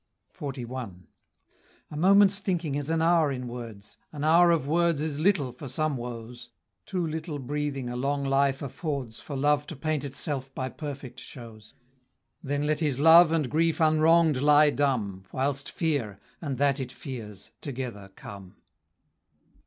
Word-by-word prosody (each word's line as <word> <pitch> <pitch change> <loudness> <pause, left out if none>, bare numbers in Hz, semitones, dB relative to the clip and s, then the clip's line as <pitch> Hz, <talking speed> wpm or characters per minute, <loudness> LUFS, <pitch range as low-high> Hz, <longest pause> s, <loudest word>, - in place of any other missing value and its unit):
XLI. 130 -3 -5 1.1
A - - -7
moment's 200 +4 +5
thinking 175 -7 -2
is 145 +1 -2
an 165 0 +1
hour 165 -3 +3
in 125 -2 -4
words, 115 -4 -8
An 150 -2 -6
hour 170 +3 +6
of 165 -5 +2
words 170 0 +2
is 150 -1 -2
little 155 -7 +2
for 130 +4 -9
some 150 +3 -1
woes; 120 0 -7 0.4
Too 180 -2 -1
little 160 -1 -4
breathing 140 -1 -3
a 120 - -4
long 140 +3 -1
life 135 0 +1
affords 140 -4 -4
For 145 - -7
love 145 +2 +1
to 160 - -7
paint 155 0 -2
itself 135 -1 -4
by 130 0 -3
perfect 135 -5 -7
shows; 115 -4 -12 0.7
Then 145 -1 -2
let 150 0 0
his 145 -5 0
love 165 +2 +8
and 160 -4 +1
grief 165 +5 +1
unwrong'd 160 -2 +4
lie 150 +1 +6
dumb, 110 -11 -1
Whilst 135 +1 -2
Fear, 140 - -2 0.2
and 140 -5 -3
that 140 +1 +2
it 130 - -4
fears, 115 - -8
together 120 -8 -6
come. 100 -2 -11
140 Hz, 155 wpm, -27 LUFS, 125-155 Hz, 1.1 s, love